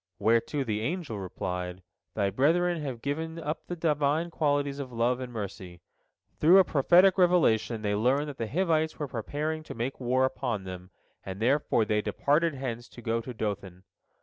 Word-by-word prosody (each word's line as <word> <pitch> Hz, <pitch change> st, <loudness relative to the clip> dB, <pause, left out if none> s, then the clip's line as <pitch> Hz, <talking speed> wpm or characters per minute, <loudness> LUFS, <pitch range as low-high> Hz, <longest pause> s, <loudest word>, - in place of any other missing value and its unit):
Whereto 115 Hz, +6 st, +1 dB
the 110 Hz, -4 st, -2 dB
angel 150 Hz, -, -3 dB
replied, 90 Hz, -1 st, -5 dB, 0.3 s
"Thy 100 Hz, -2 st, +1 dB
brethren 165 Hz, -, +2 dB
have 130 Hz, -5 st, -5 dB
given 160 Hz, +3 st, -3 dB
up 155 Hz, -1 st, -4 dB
the 175 Hz, -, -4 dB
Divine 155 Hz, 0 st, 0 dB
qualities 145 Hz, -3 st, 0 dB
of 130 Hz, -3 st, -6 dB
love 120 Hz, +2 st, +1 dB
and 125 Hz, -1 st, -6 dB
mercy. 100 Hz, -5 st, -7 dB, 0.6 s
Through 170 Hz, +5 st, +7 dB
a 190 Hz, -, +8 dB
prophetic 180 Hz, +5 st, +4 dB
revelation 130 Hz, -11 st, +3 dB
they 105 Hz, -1 st, 0 dB
learned 130 Hz, +8 st, +2 dB
that 140 Hz, -, -9 dB
the 115 Hz, -, -2 dB
Hivites 160 Hz, -, 0 dB
were 150 Hz, -, -3 dB
preparing 150 Hz, +7 st, -3 dB
to 155 Hz, -, -9 dB
make 120 Hz, +4 st, -3 dB
war 130 Hz, +1 st, +2 dB
upon 120 Hz, -6 st, -2 dB
them, 90 Hz, -1 st, -8 dB, 0.3 s
and 95 Hz, 0 st, -7 dB
therefore 120 Hz, -1 st, +2 dB
they 105 Hz, 0 st, +1 dB
departed 150 Hz, +7 st, +1 dB
hence 120 Hz, -3 st, -5 dB
to 120 Hz, -, -12 dB
go 115 Hz, 0 st, 0 dB
to 125 Hz, -, -7 dB
Dothan. 100 Hz, -5 st, -5 dB
130 Hz, 175 wpm, -28 LUFS, 110-155 Hz, 0.6 s, a